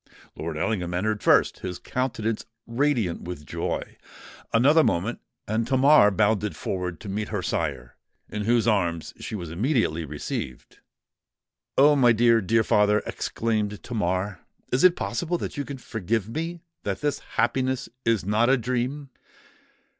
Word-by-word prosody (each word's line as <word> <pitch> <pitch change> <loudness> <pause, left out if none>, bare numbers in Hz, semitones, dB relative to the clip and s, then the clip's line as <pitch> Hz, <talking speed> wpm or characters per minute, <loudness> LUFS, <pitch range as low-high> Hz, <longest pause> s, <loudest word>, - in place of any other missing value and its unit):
Lord 80 -1 -4
Ellingham 90 -1 -1
entered 105 +3 -1
first—his 90 -1 +2
countenance 115 -4 -2 0.2
radiant 115 -7 0
with 85 -4 -7
joy. - - -4 0.5
Another 145 +8 +5
moment—and 110 +3 -2
Tamar 135 -4 +6
bounded 105 -2 +1
forward 90 -1 -3
to - - -8
meet 105 +2 -2
her 105 -4 -2
sire, 65 -7 -2 0.3
in 105 -1 -4
whose 120 0 +3
arms 85 -7 0
she - - -5
was 85 -5 -6
immediately 105 - 0
received. 70 -4 -6 1.0
"Oh! 145 +2 +7
my 120 -4 +5
dear—dear 115 -1 +3
father!" 105 0 +3
exclaimed 105 -2 -2
Tamar; 95 -4 -2 0.3
"is 125 - +2
it 180 -1 +7
possible 175 0 -2
that - - -5
you 145 - -2
can 140 -1 -7
forgive 110 -3 -2
me—that 165 - -5
this 145 -1 0 0.2
happiness 130 -1 +1 0.2
is 115 -5 +1
not 110 +4 +2
a 135 - +5
dream?" 130 +4 -2
110 Hz, 130 wpm, -25 LUFS, 95-130 Hz, 1.0 s, Oh